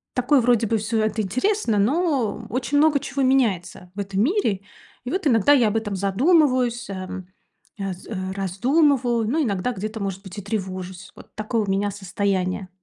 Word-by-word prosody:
такое 255 Hz, +2 st, +3 dB
вроде 230 Hz, -2 st, +3 dB
бы 225 Hz, -, +1 dB
всё 220 Hz, +2 st, -1 dB
это 215 Hz, 0 st, 0 dB
интересно, 255 Hz, -, 0 dB
но 260 Hz, -, 0 dB
очень 255 Hz, +3 st, -1 dB
много 300 Hz, -2 st, +4 dB
чего 275 Hz, 0 st, -3 dB
меняется 195 Hz, -8 st, 0 dB
в -, -, -7 dB
этом 195 Hz, 0 st, -2 dB
мире. 280 Hz, -, +1 dB, 0.4 s
И 245 Hz, -, -3 dB
вот 375 Hz, -2 st, 0 dB
иногда 230 Hz, +1 st, +4 dB
я 245 Hz, -6 st, +4 dB
об 215 Hz, -, -1 dB
этом 205 Hz, -3 st, -3 dB
задумываюсь, 245 Hz, -, +2 dB
эм 185 Hz, -1 st, -6 dB, 0.5 s
аз 190 Hz, -2 st, -5 dB
э 220 Hz, -, -5 dB, 0.2 s
раздумываю, 240 Hz, -, +1 dB
но 310 Hz, -, +1 dB
иногда 215 Hz, -2 st, -1 dB
где-то, 215 Hz, +3 st, -5 dB
может 195 Hz, -1 st, -3 dB
быть, 190 Hz, 0 st, -10 dB
и -, -, -6 dB
тревожусь. 190 Hz, -2 st, -5 dB
Вот -, -, -15 dB
такое 215 Hz, +2 st, -1 dB
у 200 Hz, -, -4 dB
меня 200 Hz, +1 st, 0 dB
состояние. 190 Hz, -1 st, -2 dB
220 Hz, 175 wpm, -23 LUFS, 195-255 Hz, 0.5 s, много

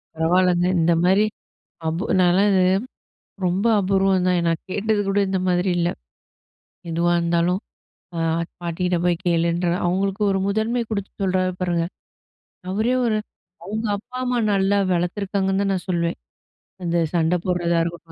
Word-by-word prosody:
பரவாலங்க. 175 Hz, +2 st, +2 dB
இந்தமாரி 175 Hz, +5 st, +3 dB, 0.6 s
அபு 165 Hz, +6 st, -2 dB, 0.2 s
நாலாம் 185 Hz, +3 st, +4 dB
இது 190 Hz, -2 st, +3 dB, 0.8 s
ரொம்ப 185 Hz, +5 st, 0 dB
அபூர்வம் 195 Hz, -1 st, +2 dB
தான். 180 Hz, -1 st, +2 dB
நான் 165 Hz, -1 st, -1 dB
கேட்டது 210 Hz, +2 st, 0 dB
கூட 200 Hz, +1 st, +2 dB
இந்த 190 Hz, -1 st, 0 dB
மாதிரி 180 Hz, +1 st, +1 dB
இல்ல. 170 Hz, 0 st, +1 dB, 1.0 s
எதுவா 170 Hz, +1 st, +1 dB
இருந்தாலும் 170 Hz, +2 st, +1 dB, 0.6 s
அ -, -, -2 dB, 0.4 s
பாட்டிக்கிட்ட 175 Hz, +1 st, -1 dB
போய் 175 Hz, 0 st, +1 dB
கேளுன்ற, 170 Hz, +1 st, +1 dB, 0.2 s
அவுங்களுக்கு 195 Hz, +3 st, 0 dB
ஒரு 195 Hz, -, +1 dB
முதன்மை 220 Hz, +4 st, 0 dB
கொடுத்து 200 Hz, -2 st, -3 dB
சொல்றாரு 185 Hz, 0 st, +1 dB
பாருங்க! 175 Hz, -2 st, 0 dB, 0.9 s
அவரே 220 Hz, +6 st, +1 dB
ஒரு 215 Hz, -1 st, +1 dB, 0.5 s
அவுங்க 215 Hz, +4 st, -3 dB
அப்பா, 245 Hz, +5 st, -11 dB
அம்மா 250 Hz, -1 st, 0 dB
நல்லா 195 Hz, +1 st, +2 dB, 0.2 s
வளர்த்துருக்காங்கன்னு 195 Hz, +2 st, 0 dB
தான் 195 Hz, -1 st, +1 dB
நான் 180 Hz, 0 st, -4 dB
சொல்லுவேன். 170 Hz, -1 st, -1 dB, 0.7 s
அந்த 170 Hz, 0 st, 0 dB, 0.2 s
சண்டை 170 Hz, +1 st, +2 dB
போடுறதா 175 Hz, -2 st, +1 dB
இருக்கட்டும். 170 Hz, -1 st, -7 dB
180 Hz, 135 wpm, -22 LUFS, 175-200 Hz, 1.0 s, நாலாம்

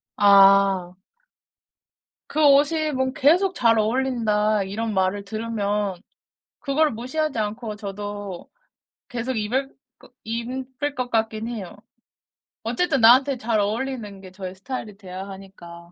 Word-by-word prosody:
아. 195 Hz, -2 st, +5 dB, 1.4 s
그 310 Hz, -, -2 dB
옷이 300 Hz, +2 st, +4 dB
뭐 260 Hz, 0 st, 0 dB
계속 350 Hz, +8 st, +3 dB
"잘 230 Hz, -5 st, +3 dB
어울린다." 215 Hz, -3 st, +1 dB
이런 215 Hz, +3 st, -3 dB
말을 190 Hz, +1 st, 0 dB
들으면 210 Hz, -2 st, -2 dB, 0.7 s
그거를 300 Hz, +1 st, +1 dB
무시하지 260 Hz, +5 st, -3 dB
않고 215 Hz, +1 st, -3 dB
저도 205 Hz, -2 st, -6 dB, 0.6 s
계속 245 Hz, +1 st, -3 dB
입을 255 Hz, +6 st, -2 dB, 0.3 s
거 -, -, -18 dB
입을 255 Hz, +5 st, -4 dB
것 250 Hz, -1 st, -3 dB
같긴 220 Hz, 0 st, -1 dB
해요. 210 Hz, -4 st, -7 dB, 0.9 s
어쨌든 270 Hz, +4 st, 0 dB
나한테 260 Hz, +4 st, +6 dB
잘 225 Hz, -2 st, 0 dB
어울리는 210 Hz, -1 st, -3 dB
게 185 Hz, -1 st, -12 dB
저의 185 Hz, 0 st, -7 dB
스타일이 215 Hz, 0 st, -6 dB
돼야 190 Hz, -1 st, -8 dB
하니까. 175 Hz, -3 st, -12 dB
220 Hz, 245 characters per minute, -23 LUFS, 200-260 Hz, 1.4 s, 나한테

